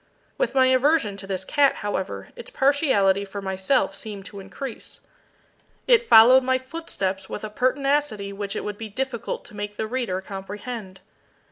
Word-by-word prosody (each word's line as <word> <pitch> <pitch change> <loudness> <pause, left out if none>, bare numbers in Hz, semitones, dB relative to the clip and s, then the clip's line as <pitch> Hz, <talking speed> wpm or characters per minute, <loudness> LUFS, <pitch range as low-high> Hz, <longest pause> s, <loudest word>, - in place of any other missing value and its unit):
With 240 - -1
my 260 -1 +5
aversion 260 -4 +3
to 195 0 -10
this 190 -1 -3
cat, 285 +2 +3
however, 200 -2 -3
its 485 0 -9
partiality 265 - +2
for 200 0 -7
myself 190 +2 0
seemed 200 -1 -7
to 200 - -9
increase. 220 +6 -8 0.8
It 485 -2 +5
followed 250 - +9
my 260 0 +1
footsteps 255 - -4
with 210 - -6
a 215 - -5
pertinacity 255 -4 0
which 200 0 -4
it - - -3
would 210 -1 -5
be 220 -1 -6
difficult 250 +1 -4
to - - -13
make 205 0 -5
the 220 - -1
reader 225 -5 -2
comprehend. 195 +1 -7
215 Hz, 160 wpm, -24 LUFS, 195-265 Hz, 0.8 s, followed